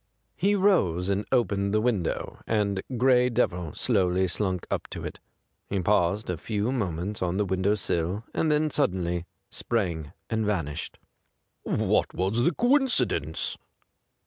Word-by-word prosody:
He 195 Hz, +8 st, +2 dB
rose 100 Hz, -, +2 dB
and 100 Hz, +1 st, 0 dB
opened 100 Hz, -5 st, +1 dB
the -, -, +4 dB
window, 110 Hz, -7 st, -1 dB
and 100 Hz, -3 st, +1 dB, 0.2 s
Gray 125 Hz, 0 st, +4 dB
Devil 90 Hz, -9 st, -1 dB
slowly 95 Hz, -5 st, +2 dB
slunk 95 Hz, -1 st, -1 dB
up -, -, -2 dB
to -, -, -6 dB
it. -, -, -6 dB, 0.5 s
He 100 Hz, -, 0 dB
paused 100 Hz, +2 st, +2 dB
a 90 Hz, -, -2 dB
few 105 Hz, +7 st, -1 dB
monments 100 Hz, -4 st, -2 dB
on 90 Hz, 0 st, 0 dB
the 105 Hz, -, +1 dB
window 95 Hz, +2 st, +1 dB
sill 90 Hz, +1 st, -1 dB
and 160 Hz, -, +1 dB
then 150 Hz, 0 st, +2 dB
suddenly 90 Hz, -, 0 dB, 0.2 s
sprang 85 Hz, -10 st, -2 dB, 0.2 s
and 110 Hz, -1 st, -1 dB
vanished. 85 Hz, -8 st, -2 dB, 0.6 s
'What -, -, 0 dB
was 95 Hz, +6 st, +1 dB
the 150 Hz, -, +3 dB
coincidence?' 185 Hz, -, +1 dB
100 Hz, 140 wpm, -27 LUFS, 90-120 Hz, 0.6 s, the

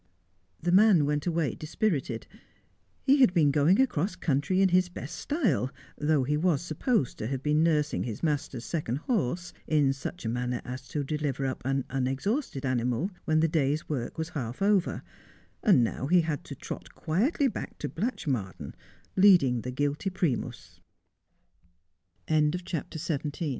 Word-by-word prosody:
The 175 Hz, -, -1 dB
man 190 Hz, -5 st, +6 dB
went 150 Hz, +2 st, -1 dB
away 165 Hz, -4 st, 0 dB
dispirited. 150 Hz, -, -2 dB, 0.8 s
He 275 Hz, +2 st, +5 dB
had 195 Hz, -8 st, +5 dB
been 150 Hz, -4 st, +5 dB
going 150 Hz, -, +4 dB
across 205 Hz, -, +1 dB
country 160 Hz, +2 st, 0 dB
in 195 Hz, -1 st, +5 dB
his 180 Hz, 0 st, +3 dB
best 145 Hz, -4 st, -7 dB
style, 225 Hz, -, 0 dB, 0.3 s
though 150 Hz, -2 st, +2 dB
he 145 Hz, +3 st, 0 dB
was 165 Hz, -2 st, +1 dB
supposed 175 Hz, -, 0 dB
to 110 Hz, -, -3 dB
have 135 Hz, +1 st, -3 dB
been 150 Hz, +1 st, +2 dB
nursing 150 Hz, -, +2 dB
his 110 Hz, -, -5 dB
master's 140 Hz, -5 st, -1 dB
second 150 Hz, -8 st, -2 dB
horse 175 Hz, -, -1 dB
in 145 Hz, -3 st, +3 dB
such 135 Hz, +4 st, -7 dB
a -, -, 0 dB
manner 125 Hz, +1 st, -1 dB
as 130 Hz, +1 st, -7 dB
to 150 Hz, -, -2 dB
deliver 140 Hz, -2 st, -2 dB
up 130 Hz, -1 st, -3 dB
an 135 Hz, 0 st, 0 dB
unexhausted 135 Hz, -, -2 dB
animal 125 Hz, -, 0 dB
when 155 Hz, 0 st, +3 dB
the 165 Hz, -, +4 dB
day's 155 Hz, 0 st, 0 dB
work 130 Hz, -3 st, -3 dB
was 160 Hz, 0 st, -3 dB
half 125 Hz, -6 st, -5 dB
over, 200 Hz, -3 st, +2 dB, 0.6 s
and 185 Hz, -, +5 dB
now 125 Hz, +3 st, -2 dB
he 175 Hz, +3 st, +5 dB
had 160 Hz, -3 st, -3 dB
to -, -, -7 dB
trot -, -, -8 dB
quietly 250 Hz, -, +1 dB
back 245 Hz, -, -5 dB
to -, -, -3 dB
Blatchmardean, 135 Hz, -, -3 dB, 0.4 s
leading 175 Hz, -, +5 dB
the 145 Hz, -, -2 dB
150 Hz, 145 wpm, -28 LUFS, 135-180 Hz, 0.8 s, man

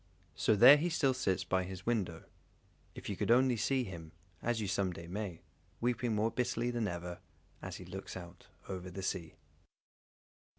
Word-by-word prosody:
So 110 Hz, -, +3 dB
there 125 Hz, +8 st, +10 dB
he 165 Hz, +4 st, 0 dB
still 140 Hz, -6 st, +2 dB
sits 95 Hz, -8 st, 0 dB
by 95 Hz, 0 st, +1 dB
his 95 Hz, 0 st, -7 dB
window, 95 Hz, -9 st, -1 dB, 0.7 s
if -, -, -8 dB
you -, -, -2 dB
could -, -, -2 dB
only 125 Hz, +1 st, +5 dB
see 130 Hz, +3 st, +1 dB
him, 85 Hz, -6 st, -8 dB, 0.3 s
as 120 Hz, -1 st, 0 dB
you 105 Hz, -, -2 dB
some 95 Hz, -1 st, 0 dB
day 85 Hz, -1 st, -8 dB
may, 90 Hz, -1 st, -5 dB, 0.4 s
weeping 120 Hz, -1 st, 0 dB
more 110 Hz, +2 st, +1 dB
bitterly 120 Hz, -1 st, 0 dB
than 120 Hz, -3 st, -1 dB
ever, 90 Hz, -1 st, -5 dB, 0.4 s
as -, -, -6 dB
he 90 Hz, -, -9 dB
looks 95 Hz, +1 st, -7 dB
out 90 Hz, -1 st, -11 dB, 0.2 s
over 90 Hz, -1 st, -5 dB
the 95 Hz, +2 st, -6 dB
sea. 85 Hz, -4 st, -3 dB
100 Hz, 175 wpm, -34 LUFS, 90-120 Hz, 0.7 s, there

